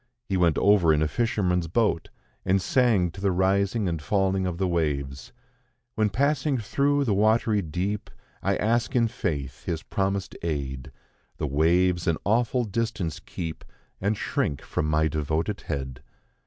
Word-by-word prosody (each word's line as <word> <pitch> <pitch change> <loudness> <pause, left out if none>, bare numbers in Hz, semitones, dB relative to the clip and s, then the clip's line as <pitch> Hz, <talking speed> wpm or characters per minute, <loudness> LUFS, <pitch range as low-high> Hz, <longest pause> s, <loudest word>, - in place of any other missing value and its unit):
He 95 - -2
went 85 -4 +3
over 100 -5 +5
in 75 0 +3
a - - +2
fisherman's 90 -5 0
boat, 100 -2 +1 0.3
and 95 +1 +2
sang 105 -5 +2
to 95 - -10
the 100 - +2
rising 100 +3 +1
and 85 -3 -2
falling 95 +2 +1
of 85 -2 -3
the 95 0 0
waves: 70 -6 -2 0.6
"When 110 -1 +1
passing 140 +4 +1
through 140 +6 +1
the 115 -6 +1
watery 110 +1 +3
deep, 95 +5 -3 0.3
I - - +1
ask 115 +4 0
in 115 -2 +4
faith 70 -11 -4
His 80 -2 -3
promised 100 0 -2
aid; 70 -4 -3 0.5
The - - -2
waves 85 +5 +2
an 80 -2 +2
awful 120 +3 +2
distance 105 -7 -2
keep, 80 -2 -6 0.4
And 100 +2 0
shrink 70 - -1
from 75 - -2
my 75 +1 +2
devoted 80 +5 -2
head. 65 -2 -4
95 Hz, 155 wpm, -26 LUFS, 80-105 Hz, 0.6 s, over